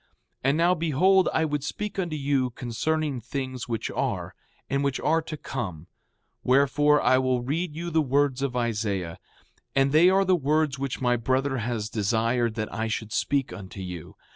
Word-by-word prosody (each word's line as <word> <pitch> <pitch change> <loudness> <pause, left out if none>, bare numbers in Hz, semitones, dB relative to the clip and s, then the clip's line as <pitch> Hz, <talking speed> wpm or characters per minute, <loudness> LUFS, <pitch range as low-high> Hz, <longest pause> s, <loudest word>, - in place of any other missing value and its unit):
6:4 - - -39 0.4
And 140 +3 +3
now, 170 +2 +4
behold, 180 +3 +3
I 160 - +1
would 150 -2 -2
speak 210 +6 -4
unto 170 -4 -2
you 140 -3 +1
concerning 135 +3 -2
things 130 +1 -5
which 115 -3 -3
are, - - -2 0.3
and 140 +1 0
which 140 -2 0
are 160 +2 +2
to 155 -1 -7
come; 95 - -5 0.6
wherefore, 145 +3 +4
I 130 - +4
will 130 -2 0
read 150 +4 -2
you 170 +1 -4
the 160 0 +3
words 140 -1 +1
of 135 -3 -2
Isaiah. 105 -7 -2 0.6
And 135 0 +3
they 160 +5 +6
are 195 +1 +3
the 185 0 +4
words 150 -2 +1
which 135 -2 -3
my 120 -1 +2
brother 130 +3 0
has 115 -2 -2
desired 115 +2 0
that 110 -1 -4
I 110 -1 -2
should 110 -1 -4
speak 140 -2 0
unto 95 0 -9
you. 90 -3 -7
135 Hz, 180 wpm, -26 LUFS, 120-155 Hz, 0.6 s, they